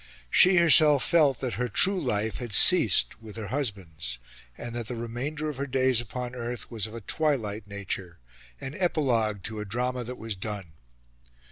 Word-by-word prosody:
She 185 +1 +6
herself 155 -4 +5
felt 150 -7 +3
that 130 -3 -3
her 125 - -1
true 190 - +5
life 110 - -2
had 120 -4 -7
ceased 120 - +5
with 110 -2 -11
her 110 -3 -6
husband's, 90 - -4 0.4
and 120 -1 -7
that 120 -2 -5
the 125 - -5
remainder 125 +7 -5
of 150 -3 -5
her 140 +1 -3
days 130 -2 +2
upon 125 +2 -6
earth 120 0 -6
was 110 -3 -1
of 110 - -11
a 115 - -7
twilight 110 -6 -2
nature 100 -3 -6 0.4
an 135 - -7
epilogue 120 - 0
to 110 0 -5
a 105 - -5
drama 125 +4 -3
that 125 +2 -8
was 110 -2 -5
done. 100 -3 -7
120 Hz, 175 wpm, -26 LUFS, 105-135 Hz, 0.4 s, She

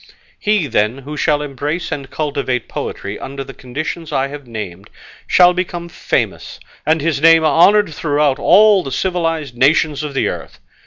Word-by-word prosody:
He, 210 -5 +1
then, 110 -2 0
who 140 +3 -8
shall 150 0 +1
embrace 145 +5 -4
and 140 -3 -5
cultivate 140 -5 -2
poetry 100 +1 -5
under 135 0 -6
the 135 - -11
conditions 150 +6 -6
I 135 -1 0
have 145 -2 -9
named, 105 -4 -7 0.4
shall 180 0 +5
become 175 -1 -4
famous, - - -3 0.3
and 160 0 +2
his 150 -2 -1
name 165 0 +6
honoured 185 +3 +4
throughout 145 -3 0
all 210 -2 +5
the 135 - -7
civilised 165 -7 -2
nations 145 +3 +2
of 150 -2 -6
the - - +1
earth. - - -6
150 Hz, 160 wpm, -17 LUFS, 135-165 Hz, 0.4 s, name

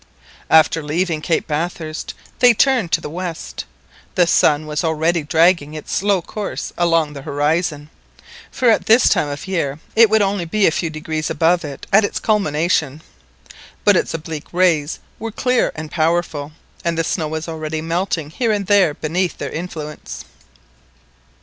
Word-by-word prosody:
After 160 +1 +5
leaving 160 +1 -1
Cape 165 +1 0
Bathurst 155 0 -4 0.2
they 245 -2 +6
turned 245 -8 +2
to 165 - +2
the - - -5
west. 175 -1 -5 0.5
The 180 - +5
sun 155 -2 +3
was 150 +1 -2
already 160 +1 +1
dragging 160 0 +2
its 155 - -7
slow 195 -2 +1
course 210 -2 -5
along 165 -3 +1
the 140 - -8
horizon, 150 +2 -1 0.6
for 255 - -1
at - - +1
this 230 +3 +6
time 150 - +2
of 145 0 -6
year 145 -7 -1 0.2
it 225 -1 +7
would 220 -1 +4
only 195 -3 -1
be 200 +5 +1
a - - +4
few 165 +1 -2
degrees 155 -1 -4
above 170 +1 +2
it 145 -3 -7
at 215 +2 +6
its 205 - -1
culmination. 160 -7 0 0.8
But - - +5
its - - 0
oblique 160 -1 -7
rays 170 -4 +2 0.2
were 225 0 -4
clear 250 +3 +1
and 155 -1 -7
powerful, 160 -3 0 0.3
and 170 -1 -1
the 165 - +1
snow 160 -1 -1
was 160 +1 -4
already 160 -1 -4
melting 165 -1 -2
here 230 +6 0
and 205 -2 -1
there 190 -6 +3
beneath 175 +3 -2
their - - -5
influence. 155 -3 -7
165 Hz, 160 wpm, -19 LUFS, 155-185 Hz, 0.8 s, it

